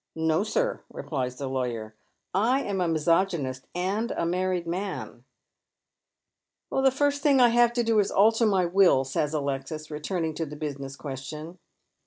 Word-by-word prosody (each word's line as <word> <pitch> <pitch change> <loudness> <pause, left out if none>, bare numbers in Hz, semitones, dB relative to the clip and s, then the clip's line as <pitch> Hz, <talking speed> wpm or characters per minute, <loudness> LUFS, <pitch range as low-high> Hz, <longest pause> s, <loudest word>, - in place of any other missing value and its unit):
" - - -60 0.2
No, 160 +5 +2
sir," - - -1
replies 125 -4 -3
the 140 +1 -5
lawyer, 120 -4 -3 0.3
*' - - -53 0.2
I 275 +1 +1
am 195 -2 -2
a 175 - +1
misogynist, 160 -4 0
and 195 +6 -1
a 170 - -2
mam'ed 180 0 0
man," 185 +4 -5 0.7
" - - -60
The 270 0 +4
first 285 +2 0
thing 280 -3 +4
I 245 -1 +7
have 240 0 +4
to 240 0 +1
do 225 -2 +3
is 200 - +3
to - - -5
alter 225 +3 +4
my 190 -3 +2
will," 175 -6 +4
says 140 +2 -1
Alexis, 145 +2 -3
returning 160 +2 -2
to 165 - -3
the 150 - -8
business 140 -3 -5
question. 150 +5 -7
170 Hz, 175 wpm, -27 LUFS, 140-210 Hz, 0.7 s, I